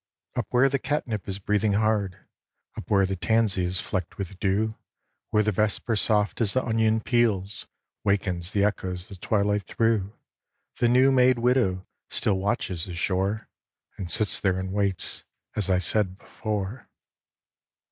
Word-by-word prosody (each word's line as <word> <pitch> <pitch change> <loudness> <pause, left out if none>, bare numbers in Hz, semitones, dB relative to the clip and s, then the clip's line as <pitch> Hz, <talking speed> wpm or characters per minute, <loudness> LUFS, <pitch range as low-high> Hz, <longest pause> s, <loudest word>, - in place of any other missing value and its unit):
Up - - -1
where 125 +2 +4
the 135 0 0
catnip 120 -8 -2
is 95 - -2
breathing 105 +1 +1
hard, 105 -3 +1 0.6
Up - - -8
where 100 -2 +4
the 95 +1 -2
tansy 105 -1 +1
is 90 +1 -1
flecked 90 -3 -4
with 95 -1 -6
dew, 105 +2 +1 0.6
Where 105 0 +3
the 110 - +1
vesper 105 +3 0
soft 105 +1 +1
as 105 -4 +3
the 130 - +1
onion 110 -1 +2
peels 110 -5 +1 0.4
Wakens 95 -3 0
the 100 -1 +2
echoes 95 -2 -2
the 100 - -9
twilight 100 0 0
through, 110 -4 +1 0.7
The 120 - +4
new 130 +3 +5
made 130 -1 +4
widow 115 -7 +1 0.2
still 95 -2 0
watches 95 -4 -1
the 90 - -7
shore 95 +4 -1 0.5
And 90 - -6
sits 105 +5 +3
there 95 -2 +1
and 95 0 -4
waits, 100 -3 -1 0.3
as 105 -3 -1
I 95 - +4
said 95 +1 0
before. 105 +2 -5
105 Hz, 155 wpm, -26 LUFS, 95-110 Hz, 0.7 s, new